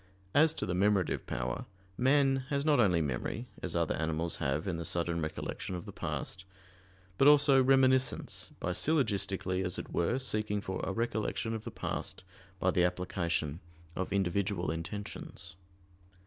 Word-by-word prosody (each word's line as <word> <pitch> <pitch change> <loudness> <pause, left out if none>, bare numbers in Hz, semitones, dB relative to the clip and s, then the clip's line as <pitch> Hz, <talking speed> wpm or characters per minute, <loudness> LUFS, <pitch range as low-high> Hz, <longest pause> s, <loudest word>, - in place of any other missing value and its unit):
As 155 +2 +5
to - - -2
the 90 - -2
memorative 100 0 +1
power, - - -3 0.3
man 135 +2 +4
has 140 0 0
not 150 -3 +4
only 90 -7 +4
memory, 75 - -3 0.2
as 90 -3 -3
other 85 -1 +1
animals 80 +1 -1
have 75 +3 -1
in 90 -3 -1
the 85 - -4
sudden 85 +1 0
recollection 80 +3 -4
of 90 - -6
the - - -7
past; 95 - -4 0.8
but 135 - +6
also 145 -2 +7
"reminiscence" 130 0 +2
by 90 - -1
syllogistically, 100 - 0
as 90 -1 -2
it - - -6
were, 85 +9 +1
seeking 110 -5 -1
for 95 -2 -4
a - - -1
recollection 115 +1 -1
of 110 -1 -5
the - - -3
past - - -4 0.4
by - - +2
the 90 - +3
application 90 -3 -1 0.4
of 95 - -3
individual 95 -2 0
intentions. 85 0 -6
95 Hz, 155 wpm, -32 LUFS, 85-120 Hz, 0.8 s, also